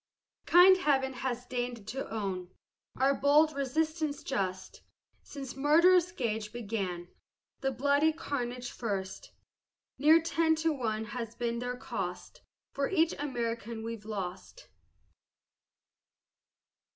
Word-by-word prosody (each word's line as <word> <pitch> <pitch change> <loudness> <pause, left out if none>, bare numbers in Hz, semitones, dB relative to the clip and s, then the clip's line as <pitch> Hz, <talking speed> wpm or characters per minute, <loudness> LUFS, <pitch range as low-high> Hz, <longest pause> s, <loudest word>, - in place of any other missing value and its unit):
Kind 365 +2 +8
Heaven 270 -6 +1
has 250 -1 -3
deign'd 245 -4 -4
to 270 +3 -4
own 190 -5 -3 0.5
Our 270 +2 +3
bold 295 +3 +4
resistance 310 +2 -1
just, 190 -6 -3 0.4
Since 270 -3 -8
murderous 340 +5 +5
Gage 220 -8 -3
began 200 -7 -4 0.5
The 270 - 0
bloody 285 +4 +2
carnage 250 -6 -4
first. 205 - -4 0.7
Near 310 +4 +7
ten 325 -1 +2
to 320 0 +1
one 220 -5 -2
has 230 -1 -6
been 235 -1 -2
their 245 0 -3
cost, - - -6 0.3
For 275 0 -1
each 335 -3 +2
American 235 -5 -3
we've 225 -2 -6
lost. 195 - -6
255 Hz, 110 wpm, -30 LUFS, 225-300 Hz, 0.7 s, Kind